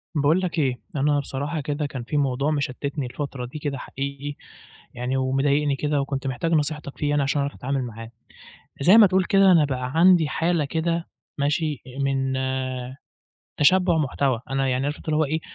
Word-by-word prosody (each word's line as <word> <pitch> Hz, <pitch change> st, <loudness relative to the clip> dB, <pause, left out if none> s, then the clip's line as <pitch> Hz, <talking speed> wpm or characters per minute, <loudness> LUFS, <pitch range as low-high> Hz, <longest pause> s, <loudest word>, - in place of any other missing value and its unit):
باقول 150 Hz, +5 st, +3 dB
لك 180 Hz, -3 st, -2 dB
إيه، 130 Hz, -4 st, 0 dB, 0.2 s
أنا 145 Hz, +1 st, +2 dB
بصراحة 145 Hz, +3 st, -3 dB
كده 145 Hz, +1 st, -2 dB
كان 135 Hz, -4 st, -5 dB
في 145 Hz, +5 st, -2 dB
موضوع 140 Hz, +1 st, +1 dB
مشتتني 140 Hz, 0 st, -2 dB
الفترة 130 Hz, 0 st, -5 dB
دي 130 Hz, +5 st, -8 dB
كده 145 Hz, -2 st, -3 dB
حقيقي 140 Hz, +2 st, -5 dB, 0.6 s
يعني 125 Hz, +2 st, -2 dB
ومضايقني 140 Hz, +2 st, +1 dB
كده 145 Hz, 0 st, 0 dB
وكنت 135 Hz, 0 st, -3 dB
محتاج 135 Hz, +6 st, -2 dB
نصيحتك 150 Hz, -2 st, -1 dB
فيه 145 Hz, -, -1 dB
يعني 145 Hz, 0 st, +2 dB
عشان 135 Hz, +1 st, 0 dB
أعرف 140 Hz, 0 st, -2 dB
أتعامل 135 Hz, 0 st, -2 dB
معاه. 115 Hz, -1 st, -8 dB, 0.7 s
زي 185 Hz, +9 st, +7 dB
ما 215 Hz, -, +9 dB
تقول 190 Hz, 0 st, +2 dB
كده 195 Hz, 0 st, +5 dB
أنا 165 Hz, -4 st, +5 dB
بقى 130 Hz, -2 st, -3 dB
عَندي 170 Hz, -1 st, +5 dB
حالة 165 Hz, 0 st, 0 dB
كده 165 Hz, +3 st, -2 dB, 0.3 s
ماشي 150 Hz, 0 st, 0 dB
إ 130 Hz, +1 st, -10 dB
من 135 Hz, -1 st, 0 dB, 1.3 s
تشبُّع 180 Hz, +2 st, +4 dB
محتوى، 135 Hz, -4 st, 0 dB
أنا 135 Hz, 0 st, 0 dB
يعني 130 Hz, +1 st, 0 dB
عارف 145 Hz, +1 st, -2 dB
أنت -, -, -15 dB
اللي 155 Hz, -, +2 dB
هو 155 Hz, -, +3 dB
إيه، 155 Hz, +2 st, -1 dB
145 Hz, 180 wpm, -24 LUFS, 135-155 Hz, 1.3 s, ما